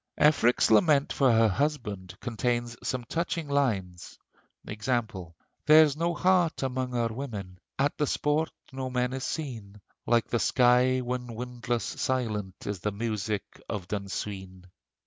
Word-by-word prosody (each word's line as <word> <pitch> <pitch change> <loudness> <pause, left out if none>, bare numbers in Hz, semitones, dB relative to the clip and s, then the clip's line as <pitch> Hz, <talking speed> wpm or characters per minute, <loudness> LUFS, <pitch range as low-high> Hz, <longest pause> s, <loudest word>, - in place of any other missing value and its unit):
Efric's 125 -7 +4
lament 140 +5 +4
for 135 -3 +4
her 115 0 +5
husband 105 - -2
contains 120 0 -2
some 130 -2 -2
touching 165 +4 -2
lines; 100 -11 -1 0.5
e. 105 - -5
g.: 110 +4 -3 0.8
"There's 155 -2 +7
no 170 +2 0
heart 175 -2 +2
among 130 -1 -2
our 120 -1 +1
women; 105 -8 -6 0.2
At 140 +3 0
the 150 - +2
sport, 150 +4 +1 0.2
no 130 -1 -4
men 125 0 -1
are 135 - -3
seen; 115 -9 -5 0.3
Like 120 -1 +3
the 120 - -1
sky 125 +1 +4
when 125 -1 -4
windless, 120 -1 -3
silent 105 -7 -2
Is 100 -2 -3
the 105 - -2
music 105 -1 -3
of 95 -4 -4
Dun 100 +1 -3
Sween!" 95 -2 -6
120 Hz, 145 wpm, -28 LUFS, 105-140 Hz, 0.8 s, There's